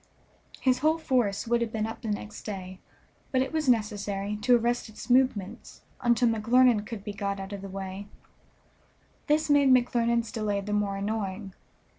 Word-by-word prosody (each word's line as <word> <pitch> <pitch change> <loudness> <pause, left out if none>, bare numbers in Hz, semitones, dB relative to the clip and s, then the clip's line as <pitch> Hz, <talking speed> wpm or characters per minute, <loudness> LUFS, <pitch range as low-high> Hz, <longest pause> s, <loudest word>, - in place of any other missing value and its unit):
His 255 -1 +2
whole 315 +3 +2
force 245 - 0
would 235 0 +2
have 230 -2 -1
been 215 -1 -1
up 225 - -6
the 230 - -6
next 210 0 -4
day, 185 -3 -7 0.5
but 260 -1 +2
it 265 - -7
was 310 -4 0
necessary 210 -3 0
to 245 +4 +4
arrest 240 0 -1
its 215 +3 -7
movements 245 -7 0 0.2
until 240 0 +3
McClernand 230 0 +3
could 220 -4 -7
be 205 - -5
got 200 -1 -3
out 195 +1 -7
of 200 - -6
the 195 - -7
way; 195 +1 -6 1.2
this 305 +1 +2
made 285 -2 +4
McClernand's 235 -2 +2
delay 215 -4 -1
the 210 +1 -4
more 205 -1 0
annoying. 200 -1 -3
220 Hz, 170 wpm, -27 LUFS, 200-245 Hz, 1.2 s, to